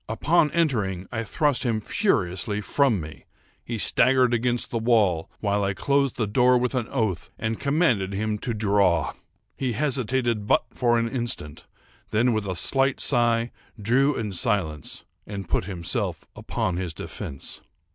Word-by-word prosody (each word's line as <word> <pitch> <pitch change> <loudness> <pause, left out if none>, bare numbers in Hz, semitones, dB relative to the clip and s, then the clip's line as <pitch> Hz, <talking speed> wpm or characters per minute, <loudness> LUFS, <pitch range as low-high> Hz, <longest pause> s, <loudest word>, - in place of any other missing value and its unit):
Upon 150 +7 +2
entering, 110 - 0
I 115 - -2
thrust 145 +3 0
him 115 -4 0
furiously 105 - 0
from 120 0 +2
me. 75 -1 -9 0.4
He 115 - -4
staggered 125 +3 +3
against 120 +1 0
the 115 - -1
wall, 105 -8 +2
while 100 -1 +1
I 95 0 -1
closed 140 +1 +1
the 115 - 0
door 125 +4 +4
with 125 +1 -1
an 125 -3 -1
oath, 100 -6 -2
and 110 0 -3
commanded 140 - +1
him 105 +2 -2
to 120 +1 -2
draw. 100 -4 +2 0.4
He 130 -3 -2
hesitated 125 -4 0
but - - +3
for 120 -2 +2
an 115 0 +1
instant; 115 - -3 0.4
then, 120 +3 +2
with 110 -2 -2
a 95 - -2
slight 135 +7 +2
sigh, 120 -2 +2 0.3
drew 130 +7 +2
in 105 -3 -3
silence, 90 -7 -1 0.2
and 100 -3 -6
put - - 0
himself 85 -5 -2
upon 85 - -2
his 90 -4 -4
defence. 70 -3 -6
115 Hz, 155 wpm, -25 LUFS, 100-125 Hz, 0.4 s, door